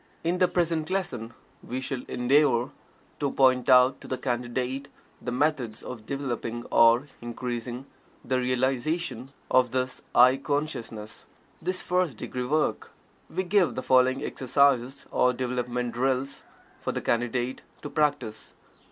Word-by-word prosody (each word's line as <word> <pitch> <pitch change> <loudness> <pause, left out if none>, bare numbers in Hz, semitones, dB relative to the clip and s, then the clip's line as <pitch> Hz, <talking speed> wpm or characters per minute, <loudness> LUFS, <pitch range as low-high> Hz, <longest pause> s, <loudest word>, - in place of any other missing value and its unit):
In 175 +2 0
the 180 - +5
present 165 -3 0
lesson 130 - -2 0.3
we 125 - -4
shall 130 -1 -4
endeavor 125 0 +2 0.5
to 145 - +1
point 130 -2 +3
out 125 0 +6
to - - -10
the 130 - -2
Candidate 125 +2 -2 0.3
the 125 - -4
methods 125 -4 0
of 115 -4 -8
developing 120 -4 -3
or 115 +4 +5
increasing 120 +1 -5 0.4
the 130 -1 +1
realization 130 +4 -1 0.2
of 130 -1 +4
this 130 +1 -2
"I" 125 +2 +7
consciousness 135 -7 -4 0.3
this 185 +2 -2
first 180 -9 0
degree 125 +2 -4
work. 155 +3 0 0.4
We 185 +3 -2
give 185 -1 +2
the 130 - -3
following 130 +1 +3
exercises 135 -1 +1
or 125 - +3
development 125 -1 -2
drills 135 +2 -1 0.3
for - - -2
the - - -3
Candidate 120 +2 -1 0.2
to 145 - -5
practice. 145 -8 -1
130 Hz, 135 wpm, -27 LUFS, 120-145 Hz, 0.5 s, I